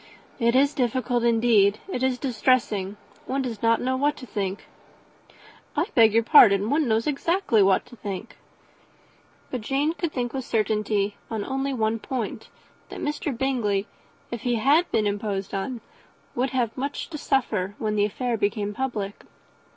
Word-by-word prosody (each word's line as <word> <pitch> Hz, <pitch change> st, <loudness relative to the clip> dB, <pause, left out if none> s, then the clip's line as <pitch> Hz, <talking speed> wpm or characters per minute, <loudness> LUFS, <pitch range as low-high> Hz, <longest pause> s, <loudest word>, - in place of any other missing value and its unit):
"It 235 Hz, 0 st, +2 dB
is 280 Hz, +2 st, +4 dB
difficult, 245 Hz, -1 st, 0 dB
indeed 225 Hz, -3 st, +4 dB
it 310 Hz, -10 st, -4 dB
is 260 Hz, -1 st, +1 dB
distressing. 220 Hz, -6 st, 0 dB, 0.3 s
One 270 Hz, +1 st, -1 dB
does 235 Hz, -5 st, -5 dB
not 230 Hz, 0 st, +3 dB
know 260 Hz, +1 st, 0 dB
what 290 Hz, +3 st, +1 dB
to 255 Hz, -, -9 dB
think." 200 Hz, -4 st, -4 dB, 1.1 s
"I -, -, +1 dB
beg 225 Hz, -2 st, +5 dB
your 230 Hz, -, +4 dB
pardon; 215 Hz, -6 st, +6 dB
one 295 Hz, -1 st, +2 dB
knows 225 Hz, 0 st, +1 dB
exactly 300 Hz, -, +1 dB
what 190 Hz, -1 st, +3 dB
to 245 Hz, 0 st, -14 dB
think." 205 Hz, 0 st, -6 dB, 1.2 s
But 255 Hz, -, -3 dB
Jane 275 Hz, +7 st, 0 dB
could 335 Hz, -2 st, -3 dB
think 245 Hz, -3 st, -3 dB
with 265 Hz, -1 st, -3 dB
certainty 210 Hz, -2 st, 0 dB
on 220 Hz, -3 st, -3 dB
only 270 Hz, +1 st, -2 dB
one 225 Hz, -3 st, 0 dB
point, 250 Hz, -2 st, -4 dB, 0.4 s
that -, -, -8 dB
Mr. 295 Hz, -3 st, -3 dB
Bingley, 230 Hz, -7 st, 0 dB, 0.5 s
if 235 Hz, -, -4 dB
he 245 Hz, -1 st, 0 dB
had 285 Hz, +9 st, +3 dB
been 215 Hz, -, +1 dB
imposed 200 Hz, -1 st, -2 dB
on, 225 Hz, +5 st, -3 dB, 0.5 s
would 255 Hz, +2 st, 0 dB
have 245 Hz, -3 st, -1 dB
much 280 Hz, +5 st, -4 dB
to 305 Hz, -, -5 dB
suffer 210 Hz, -9 st, 0 dB
when 215 Hz, -1 st, -2 dB
the 205 Hz, -1 st, +3 dB
affair 235 Hz, +3 st, -2 dB
became 205 Hz, 0 st, -1 dB
public. 210 Hz, -6 st, -4 dB
235 Hz, 160 wpm, -25 LUFS, 210-265 Hz, 1.2 s, pardon